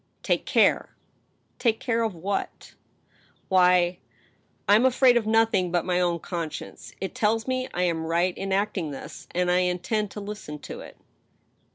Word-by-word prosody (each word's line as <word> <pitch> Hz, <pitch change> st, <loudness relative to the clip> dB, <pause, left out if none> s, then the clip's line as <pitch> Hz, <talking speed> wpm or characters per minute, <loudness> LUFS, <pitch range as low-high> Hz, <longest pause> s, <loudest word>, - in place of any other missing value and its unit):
"Take -, -, 0 dB
care!" -, -, +2 dB, 0.3 s
" -, -, -43 dB
Take 225 Hz, -3 st, +1 dB
care 230 Hz, -2 st, 0 dB
of 220 Hz, -5 st, -1 dB
what? 195 Hz, +4 st, -4 dB, 0.4 s
" -, -, -35 dB
««Why— 180 Hz, -1 st, +4 dB, 0.2 s
" -, -, -35 dB
" -, -, -41 dB
I 205 Hz, -, +6 dB
am 220 Hz, +4 st, +5 dB
afraid 260 Hz, -1 st, +5 dB
of 230 Hz, -3 st, +1 dB
nothing 220 Hz, -5 st, +2 dB
but 175 Hz, -2 st, 0 dB
my 180 Hz, -1 st, +1 dB
own 175 Hz, -1 st, +1 dB
conscience. 165 Hz, -2 st, -6 dB
It 190 Hz, -, -4 dB
tells 225 Hz, -1 st, 0 dB
me 255 Hz, 0 st, -1 dB
I 180 Hz, -, -1 dB
am 165 Hz, -2 st, -1 dB
right 175 Hz, +2 st, +1 dB
in 195 Hz, 0 st, -4 dB
acting 195 Hz, -4 st, 0 dB
thus. 140 Hz, -, -9 dB
And 180 Hz, 0 st, 0 dB
I 180 Hz, -, +3 dB
intend 180 Hz, +4 st, -1 dB
to 210 Hz, -, -8 dB
listen 205 Hz, -7 st, -7 dB
to -, -, -8 dB
it." -, -, -11 dB
190 Hz, 185 wpm, -25 LUFS, 175-220 Hz, 0.4 s, I